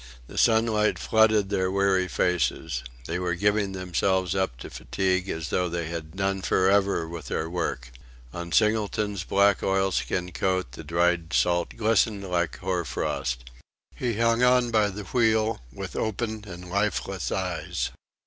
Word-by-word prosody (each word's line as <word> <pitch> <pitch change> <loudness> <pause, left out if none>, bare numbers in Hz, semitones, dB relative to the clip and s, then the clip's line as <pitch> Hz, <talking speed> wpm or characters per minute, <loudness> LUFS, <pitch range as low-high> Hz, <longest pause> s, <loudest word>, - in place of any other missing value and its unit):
The - - -13
sunlight 110 -2 +3
flooded 110 -2 +3
their 95 -2 +1
weary 95 -1 +2
faces. 80 -6 0 0.2
They 85 +2 -2
were 90 -2 -1
giving 105 +1 +1
themselves 95 0 0
up 95 -11 -1
to - - -8
fatigue 95 0 -1
as 80 -2 -3
though 90 -1 +1
they 85 -1 -3
had 80 0 -6
done 95 0 -1
for 95 0 +3
ever 100 -4 +2
with 80 -5 -7
their 80 - -2
work. 80 -8 -3 0.4
On 85 0 -6
Singleton's 105 -2 +1
black 100 0 +3
oilskin 95 -2 0
coat 95 -9 -1
the 75 +6 -9
dried 85 +1 +1
salt 85 -1 +1
glistened 110 -2 +2
like 85 -2 -1
hoar 90 -1 -1
frost. 65 -3 -3 0.5
He 120 -4 -2
hung 115 +1 +2
on 125 -1 +4
by 110 -2 +3
the 100 +1 -6
wheel, 110 - +1
with - - -7
open 110 0 -2
and 90 0 -9
lifeless 100 -6 -1
eyes. - - -2
95 Hz, 150 wpm, -26 LUFS, 85-105 Hz, 0.5 s, on